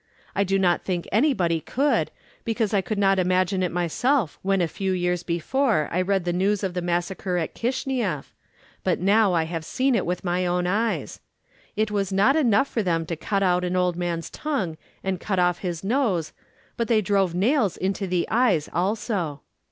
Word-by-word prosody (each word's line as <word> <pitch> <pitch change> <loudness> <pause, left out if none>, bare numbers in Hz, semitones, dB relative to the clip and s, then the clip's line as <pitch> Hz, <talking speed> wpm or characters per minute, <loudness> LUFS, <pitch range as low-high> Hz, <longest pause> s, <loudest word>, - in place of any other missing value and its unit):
I 200 - +2
do 195 0 +1
not 180 -2 +2
think 180 -2 -2
anybody 205 - +2
could, 280 - +1 0.3
because 225 -2 -1
I 200 - +3
could 210 +3 -4
not 195 -1 +3
imagine 185 +1 +1
it 180 - 0
myself 180 - 0
when 195 0 +1
a 175 - +2
few 190 +4 -2
years 180 -1 0
before 175 - 0
I 180 - +1
read 190 -1 0
the 175 - 0
news 195 +3 +1
of 190 -2 -1
the 180 - -2
massacre 175 +1 -1
in 165 - 0
Kishineff, 240 - -2 0.5
but - - +1
now 200 +1 +4
I 165 -2 +2
have 165 0 -4
seen 260 +10 0
it 230 - +2
with 180 0 -2
my 180 0 0
own 180 0 0
eyes. 215 +5 -1 0.6
It 215 0 0
was 200 -2 -1
not 200 +9 +4
enough 270 -3 +3
for 230 - -1
them 165 -4 0
to 165 - -3
cut 195 +5 -1
out 180 -1 +2
an 180 0 -1
old 180 -1 +1
man's 170 -1 -3
tongue 260 - -2 0.3
and 190 -2 -1
cut 195 -3 -2
off 180 -1 +2
his 175 -3 -4
nose, 200 - 0 0.4
but 235 - 0
they 225 -3 +3
drove 195 -3 +1
nails 215 - +2
into 195 +1 -2
the 180 -1 0
eyes 220 -10 +2
also. 180 - -1
190 Hz, 190 wpm, -24 LUFS, 175-215 Hz, 0.6 s, now